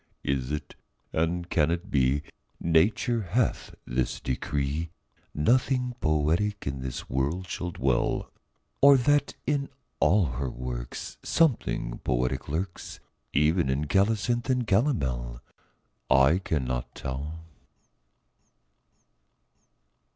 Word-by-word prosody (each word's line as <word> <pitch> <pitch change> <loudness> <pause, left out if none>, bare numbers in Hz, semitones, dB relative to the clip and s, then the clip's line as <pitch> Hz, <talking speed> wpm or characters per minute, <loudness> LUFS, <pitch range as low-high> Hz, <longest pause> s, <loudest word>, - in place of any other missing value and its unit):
Is 65 -1 -1
it, 75 - -4 0.4
and 85 +2 0
can 80 -4 +2
it 85 +4 -3
be, 70 +1 +2 0.4
Nature 100 +8 +2
hath 105 +6 -1
this 60 0 -1
decree, 70 +4 -2 0.5
Nothing 125 - +2
poetic 80 +7 +1
in 70 -1 -3
the 65 -1 -4
world 70 +9 -1
shall 90 - -3
dwell? 65 -7 0 0.5
Or 140 0 +8
that 145 +2 +2
in 140 -1 0 0.3
all 95 0 +4
her 65 0 -1
works - - -6
Something 115 - +1
poetic 65 +1 -1
lurks, 85 +4 -4 0.3
Even 75 +1 +2
in 70 +3 0
colocynth 110 - +1
and 125 -2 +2
calomel? 65 - 0 0.7
I 65 +6 +5
cannot 65 -9 -2
tell. 75 +5 -5
80 Hz, 100 wpm, -27 LUFS, 65-105 Hz, 0.7 s, Or